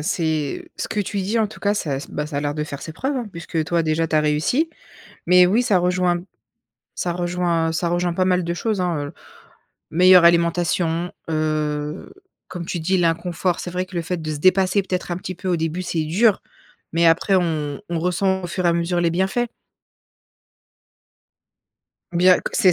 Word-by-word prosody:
c'est 155 -3 -2
ce - - -4
que 210 - -3
tu 200 0 -2
dis, 205 +5 -1
en 220 - +2
tout 210 - -13
cas, 205 0 +1
ça 140 -8 -2
bah, 150 - -3
ça 150 -2 -6
a - - -1
l'air 145 0 -2
de 150 -1 -2
faire 140 -2 -7
ses 160 - -7
preuves, 270 - -2
hein, 235 -4 -3
puisque 165 -2 -3
toi 170 0 +1
déjà 160 +1 0
tu 155 - +1
as - - +5
réussi. 150 - +1 0.6
Mais 180 0 +6
oui, 215 +7 +2
ça 205 -7 +3
rejoint 180 -1 +1 0.7
ça 175 - -2
rejoint 175 -2 0
ça 170 +1 -1
rejoint 175 0 0
pas 185 +2 +1
mal 180 -1 +2
de 170 +1 -2
choses, 205 +1 -1
hein, 165 -5 -1
heu, - - -10 0.8
meilleure 180 +1 +7
alimentation, 170 0 +2 0.2
heu, 155 0 -2 0.4
comme 175 -2 -6
tu 175 - -3
dis 185 +4 +1
l'inconfort, 170 +1 0
c'est 180 - -5
vrai 180 +1 -2
que 185 0 -13
le 170 - 0
fait 180 0 -2
de 155 0 -4
se 145 - -4
dépasser 185 +2 +3
peut-être 185 -1 -3
un 175 - -1
petit 185 -1 -6
peu 185 +1 -7
au 175 - +2
début, 165 +3 -2
c'est 160 -3 -1
dur. 200 +6 +3 0.5
Mais 170 0 +3
après 165 +4 +3
on 155 -5 -1
on 170 -2 -1
ressent 190 +2 0
au - - -3
fur 180 +1 -3
et - - +5
à - - +2
mesure 170 +1 0
les 170 -1 +2
bienfaits. 190 +7 0 2.7
Bien, 180 +1 +5
que - - -5
c'est 185 -2 +5
175 Hz, 200 wpm, -21 LUFS, 160-185 Hz, 2.7 s, meilleure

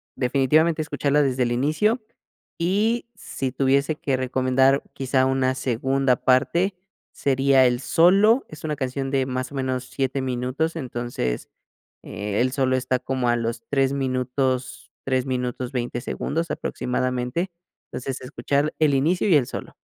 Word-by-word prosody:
definitivamente, 150 +5 +2
escucharla 145 -1 +1
desde 130 -2 +1
el 120 - -1
inicio, 155 - +1 0.6
y, 210 +8 +1
si 135 -9 -4
tuviese 140 +3 +1
que 140 -2 -1
recomendar 130 +1 +2
quizá 130 0 +1
una 130 -1 +1
segunda 130 +1 +1
parte, 170 +9 +2 0.4
sería 135 -1 +3
el 125 -1 +2
solo. 200 - +4
Es 155 -1 -11
una 150 -1 -1
canción 135 0 -3
de, 135 -2 +1
más 130 0 -3
o - - -8
menos, 130 -1 -2
7 135 0 -2
minutos, 130 +6 -2
entonces, 120 - -3 0.5
eh, 105 0 -4
el 130 +1 +1
solo 130 -1 +1
está 130 0 0
como 130 -1 -1
a 120 - +3
los 115 0 -3
3 135 -1 +2
minutos, 130 -1 -2
3 130 -1 0
minutos, 125 -1 -3
20 120 -2 -3
segundos 165 +5 -3
aproximadamente. 125 +7 -2 0.4
Entonces, 130 +1 -5
escuchar 140 +3 -1
el 155 -3 +3
inicio 160 +9 +2
y 175 - +6
el 135 -5 +3
solo. - - -7
135 Hz, 145 wpm, -23 LUFS, 125-145 Hz, 0.6 s, y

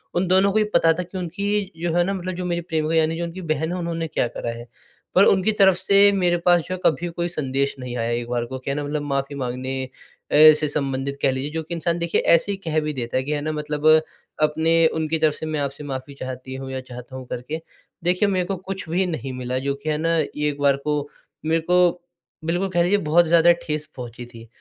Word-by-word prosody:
उन 180 +1 +1
दोनों 190 +2 +4
को 210 - 0
ही 215 - +4
पता 165 0 +5
था 180 +3 -3
कि, 180 +2 -9
उनकी 200 +3 -2
जो 170 -1 -1
है 175 - +4
ना 195 +3 -1
मतलब 185 -1 -4
जो 180 0 -4
मेरी 175 -1 -1
प्रेमिका 160 -1 -1
यानी 160 0 +2
जो 170 - -2
उनकी 170 +2 -6
बहन 160 +2 -3
है, 180 - -2
उन्होंने 165 -2 -3
क्या 135 - 0
करा 120 - -5
है। 120 +1 -10 0.5
पर 190 - +7
उनकी 190 +2 +3
तरफ 195 -3 +5
से 200 +2 +5
मेरे 180 -3 +2
पास 175 -1 +5
जो 185 - -3
है 185 - -4
कभी 165 +3 +2
कोई 170 +1 -2
संदेश 140 -4 -1
नहीं 125 -1 -5
आया 115 0 -1
एक 120 0 -2
बार 120 -1 -1
को 130 +2 -6
कि 130 - -6
है 140 - 0
ना 145 - -2
मतलब 145 +1 -2
माफ़ी 140 -1 -2
माँगने, 130 0 -3 0.4
ऐसे 155 0 +7
संबंधित 140 -1 -2
कह - - +3
लीजिए 130 +3 -2
जो 160 +1 -3
कि 165 - -6
इंसान 170 0 -1
देखिए 170 0 +1
ऐसे 170 +4 +3
ही 200 - -3
कह 160 -1 +1
भी 150 0 -3
देता 120 -3 -3
है 130 - +1
कि 145 - -4
है 150 -1 -1
ना 155 +1 -2
मतलब 150 0 -4 0.6
अपने 160 +2 +2 0.2
उनकी 160 0 0
तरफ 155 -1 +3
से 160 - -5
मैं 155 -1 -2
आपसे 140 +1 -3
माफ़ी 135 0 -6
चाहती 130 -1 -7
हूँ 135 0 -6
या 130 - -3
चाहता 125 0 -10
हूँ 130 -1 -7
करके। 150 +8 -5 0.4
देखिए, 180 +4 +2
मेरे 185 -2 0
को 195 - -2
कुछ 190 -1 -6
भी 180 +3 +1
नहीं 135 -6 -4
मिला 125 0 -2
जो 140 +1 -2
कि 155 - -2
है 150 - +1
ना 165 +2 +1
एक 150 -1 -1
बार 140 -1 +4
को, 145 0 -2 0.4
मेरे 160 +1 +2
को 180 0 +5 0.6
बिल्कुल 175 +4 0
कह 175 -2 +2
लीजिए 190 +4 +3
बहुत 170 -1 +3
ज़्यादा 170 +1 +6
ठेस 150 0 -2
पहुँची 120 -1 -8
थी 115 -1 -13
155 Hz, 245 wpm, -22 LUFS, 135-175 Hz, 0.6 s, पर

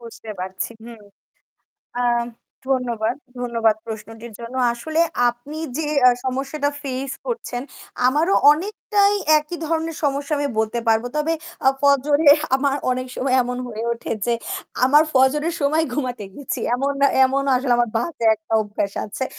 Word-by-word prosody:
বুঝতে 230 -1 -10
পারছি 185 +2 -4
হুম। 230 -2 -11 1.0
আ - - +1 0.7
ধন্যবাদ, 240 -4 0 0.2
ধন্যবাদ 230 -3 +1
প্রশ্নটির 225 +1 -8
জন্য। 235 +1 -8 0.2
আসলে 315 +7 -2 0.3
আপনি 260 +6 -10 0.2
যে 315 - -1 0.2
আ - - +7
সমস্যাটা 275 +3 -1
ফেস 270 -1 -4
করছেন 460 - -4 0.4
আমারও 310 +8 +2 0.2
অনেকটাই 405 +4 +1 0.2
একই 300 +3 -6
ধরনের 325 0 -2
সমস্যা 280 +1 0
আমি 285 0 0
বলতে 220 +2 0
পারব। 225 +1 +3
তবে 300 +2 +1 0.3
আ - - +9
ফজরে 285 +2 +3 0.3
আমার 275 0 +1 0.2
অনেক 255 0 -1
সময় 260 0 0
এমন 245 0 -4
হয়ে 225 -1 -5
ওঠে 235 - -5
যে 240 - +2 0.5
আমার 290 +4 +6
ফজরের 295 +5 +3
সময় 305 +3 +2
ঘুমাতে 250 -6 -3
গেছি। 285 +1 -5
এমন 275 +3 0 0.3
এমন 270 +1 +1
আসলে 255 0 +1
আমার 240 0 +2
বাজে 245 0 -4
একটা 215 +1 -12
অভ্যাস 205 -1 -3
আছে 215 +6 -4
260 Hz, 140 wpm, -21 LUFS, 235-295 Hz, 1.0 s, আ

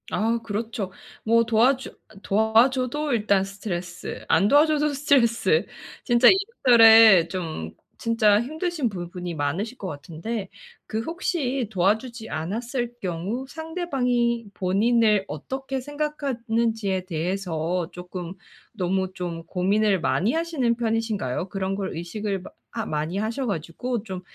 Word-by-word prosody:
아, 230 +2 0
그렇죠. 215 -2 -4 0.3
뭐 230 +1 +4
도와주 250 +4 +2 0.2
아 215 - -18
도와줘도 250 +7 +2
일단 205 -4 +2
스트레스, 185 -3 -6
안 200 - +4
도와줘도 300 +2 +4
스트레스. 280 - +2 0.4
진짜 240 -1 +5
이래저래 225 - +7
좀 160 - -5 0.3
진짜 220 -2 +3
힘드신 315 0 -2
부분이 175 -2 -6
많으실 170 - -2
것 195 - -6
같은데, 180 +7 -5 0.4
그 220 +1 -2
혹시 275 - -2
도와주지 220 +5 0
않았을 235 - -3
경우 190 +6 -3
상대방이 260 -8 -1
본인을 210 +2 +2
어떻게 265 - -5
생각하는지에 235 -9 -2
대해서 175 -1 -2
조금 180 0 -7 0.4
너무 190 0 -1
좀 170 -2 -5
고민을 195 +2 +1
많이 210 +8 +1
하시는 320 -8 0
편이신가요? 220 - -2
그런 195 0 -2
걸 195 -1 -4
의식을 195 +4 -3
마 - - -10 0.2
하 225 -2 -3
많이 155 +4 -2
하셔 225 +6 -2
가지고 205 +6 -3
좀 190 -4 -6
220 Hz, 285 characters per minute, -24 LUFS, 185-245 Hz, 0.4 s, 이래저래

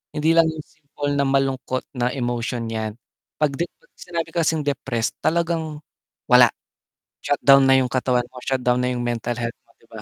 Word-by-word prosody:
Hindi 155 +2 +2
lang 165 - +7
yung 160 -1 -4
simple 145 -1 -6
na 140 - +2
malungkot 135 -1 0
na 120 0 +1
emotion 120 -2 -2
'yan. 110 -1 -3 0.5
'Pag 140 -2 +1
dep 170 - 0
'pag - - -29
sinabi 170 -2 -4
kasing 160 -2 +1
depressed 130 -5 -1
talagang, 160 -2 -1 0.5
wala, - - +8 0.8
shutdown 140 -1 +5
na 135 - +6
yung 125 - -1
katawan 125 -1 +1
mo, 130 - -14
shutdown 125 -2 +1
na 125 - 0
yung 120 - -3
mental 120 0 -2
health 115 0 -4
mo, - - -36
'di - - -25
ba? - - -9
135 Hz, 180 wpm, -22 LUFS, 125-155 Hz, 0.8 s, wala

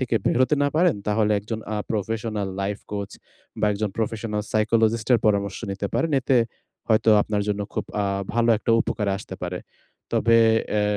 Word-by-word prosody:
থেকে 125 -2 -1
বের - - +2
হতে 130 - +3
না 145 - +3
পারেন, 170 - +3
তাহলে 105 0 +2
একজন 110 +2 -5 0.2
আ - - -1
professional 110 -1 -2
life 100 +1 -3
coach 100 -1 -4 0.5
বা - - +3
একজন 105 +1 -1
professional 110 -2 -2
psychologist 110 +1 +1
এর 120 - +6
পরামর্শ 100 -2 +1
নিতে 100 +1 -3
পারেন। 165 - +1
এতে 130 0 +2 0.5
হয়তো 110 0 +4
আপনার 105 -1 -1
জন্য 105 0 -1
খুব - - -2 0.2
আ - - 0 0.3
ভালো 120 0 +2
একটা 115 - -2
উপকারে 105 -3 -1
আসতে 95 -2 -8
পারে। 90 0 -3 0.5
তবে 115 0 +4 0.4
অ্যা 105 -1 +2
110 Hz, 175 wpm, -24 LUFS, 105-115 Hz, 0.5 s, এর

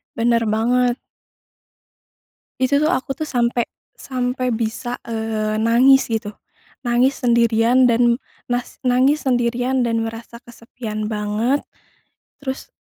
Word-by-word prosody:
Bener 230 0 +2
banget. 240 +3 +1 1.6
Itu 280 +3 +2
tuh, 310 - +2
aku 275 -5 -1
tuh 310 +1 -5
sampe 240 -1 0 0.3
sampe 255 -1 -2
bisa, 230 +2 -3
eee, 220 -1 -2
nangis 250 +4 +5
gitu, 220 -2 -3 0.5
nangis 245 +3 +2
sendirian 235 +1 +3
dan 235 0 +3 0.3
nas 245 0 -3
nangis 260 +4 +2
sendirian 245 +1 +1
dan 230 -1 0
merasa 230 +1 -8
kesepian 230 -2 -7
banget 215 +6 0 0.8
terus 265 -1 -5
240 Hz, 110 wpm, -20 LUFS, 225-255 Hz, 1.6 s, nangis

